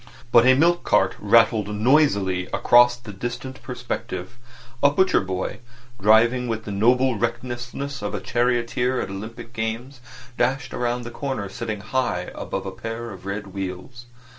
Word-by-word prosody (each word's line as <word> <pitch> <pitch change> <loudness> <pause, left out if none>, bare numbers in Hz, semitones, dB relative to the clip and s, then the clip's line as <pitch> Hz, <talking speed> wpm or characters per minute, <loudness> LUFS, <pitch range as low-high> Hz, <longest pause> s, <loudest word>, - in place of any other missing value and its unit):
But 120 +1 +6
a 130 - +7
milk 170 +5 +3
cart 95 0 +2
rattled 110 0 +4
noisily 100 -7 +2
across 120 0 +5
the 120 -4 -10
distant 120 +5 -6
perspective; 120 -4 -5 0.4
a 140 - +6
butcher 185 +6 +3
boy, 95 -1 -4 0.4
driving 120 +4 +4
with 110 -1 -3
the 105 - -5
noble 120 +3 +2
recklessness 120 +3 -4
of 105 0 -3
a - - -2
charioteer 120 +2 0
at - - -3
Olympic 110 +4 -8
Games, 115 +4 -4 0.4
dashed 130 +4 0
round 120 0 -1
the 120 - -7
corner 130 -6 -4
sitting 110 0 -5
high 110 -5 -2
above - - -5
a - - -4
pair 115 +1 -6
of 95 0 -10
red 100 -1 -5
wheels. 95 +6 -6
120 Hz, 150 wpm, -23 LUFS, 105-125 Hz, 0.4 s, a